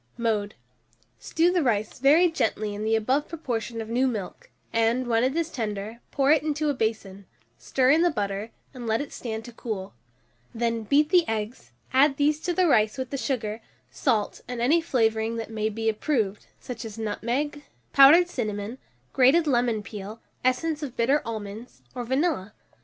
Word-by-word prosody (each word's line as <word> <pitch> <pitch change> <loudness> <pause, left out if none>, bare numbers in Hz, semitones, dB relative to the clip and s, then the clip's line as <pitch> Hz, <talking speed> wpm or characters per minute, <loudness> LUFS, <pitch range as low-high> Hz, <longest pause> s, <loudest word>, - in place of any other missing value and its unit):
Mode. 215 -3 -1 0.6
Stew 335 +2 +1
the 360 -1 +2
rice 220 -6 -1
very 300 +7 +5
gently 215 -7 -1
in 205 +1 -5
the 220 +1 +2
above 260 +7 +1
proportion 235 -8 -4
of 220 - -6
new 250 +4 +1
milk, 210 -7 -5 0.2
and, 230 +3 +2
when 230 -1 +2
it 260 +3 +1
is 335 -1 -1
tender, 215 -1 -4
pour 275 +1 +2
it 305 -2 +5
into 300 0 0
a - - -2
basin; 210 -5 -3 0.3
stir 260 0 +2
in 315 +3 +4
the 350 - +4
butter, 205 -5 -3 0.2
and 245 -3 -7
let 220 0 +1
it 285 - -6
stand 225 -2 -5
to 240 - -10
cool; 210 -5 -5 0.6
then 230 0 0
beat 295 +6 +3
the 355 0 +5
eggs, 220 +1 -4 0.2
add 275 +1 +4
these 295 +1 +2
to 350 - -2
the 365 +1 +2
rice 215 -7 +3
with 260 -1 -4
the - - -2
sugar, 225 -5 -2 0.3
salt, 220 -6 0
and 245 -1 -5
any 295 +8 +3
flavouring 225 -6 0
that 225 -1 -5
may 215 -1 -1
be 225 +1 -4
approved, 220 -3 -1
such 240 -3 -7
as 220 -1 -8
nutmeg, 240 +7 -2 0.3
powdered 300 +6 +8
cinnamon, 215 - -4 0.3
grated 275 +6 +5
lemon 240 -6 +1
peel, 210 +1 -8 0.2
essence 295 +5 0
of 275 -5 -6
bitter 270 +6 +3
almonds, 220 +1 -7
or 250 -2 -4
vanilla. 260 - -1
235 Hz, 175 wpm, -26 LUFS, 220-285 Hz, 0.6 s, powdered